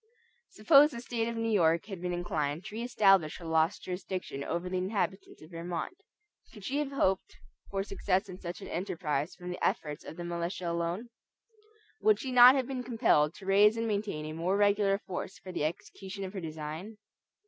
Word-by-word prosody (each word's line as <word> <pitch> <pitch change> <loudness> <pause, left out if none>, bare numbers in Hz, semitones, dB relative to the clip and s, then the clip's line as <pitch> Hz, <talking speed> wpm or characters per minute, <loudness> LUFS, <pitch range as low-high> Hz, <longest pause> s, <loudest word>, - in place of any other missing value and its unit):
Suppose 295 -1 +6
the 240 -6 -7
State 235 -1 -2
of 235 - -3
New 225 0 0
York 165 -5 +3
had 195 -4 -7
been 180 0 -2
inclined 160 -2 -2
to 215 - -8
re 225 - -4
establish 195 -9 +3
her 170 - -11
lost 160 +2 +1
jurisdiction 180 -6 -5
over 170 +4 -3
the 185 0 -1
inhabitants 190 -1 -3
of 155 - -15
Vermont, 170 - -4 0.6
could 210 - -13
she 280 +2 -1
have 290 -2 -2
hoped 195 -9 0 0.3
for 195 -1 -1
success 195 0 -1
in 185 -1 -9
such 175 0 -6
an - - -7
enterprise 165 -4 -2
from 180 0 -7
the 180 - -6
efforts 150 -1 -1
of 160 - -9
the 175 - -5
militia 170 +1 -3
alone? 170 +7 -2 0.9
Would 215 -1 +4
she 260 - -4
not 250 +1 +9
have 265 -2 +1
been 260 -1 -4
compelled 225 -11 +2
to 195 - -12
raise 205 +3 +5
and 230 - -1
to - - -1
maintain 200 -7 -2
a 155 - -5
more 175 +5 0
regular 205 -1 +3
force 190 -2 -6
for 185 - -9
the 150 - -1
execution 190 +4 -6
of 190 0 -6
her 190 - -5
design? 160 +6 -6
190 Hz, 200 wpm, -30 LUFS, 170-215 Hz, 0.9 s, not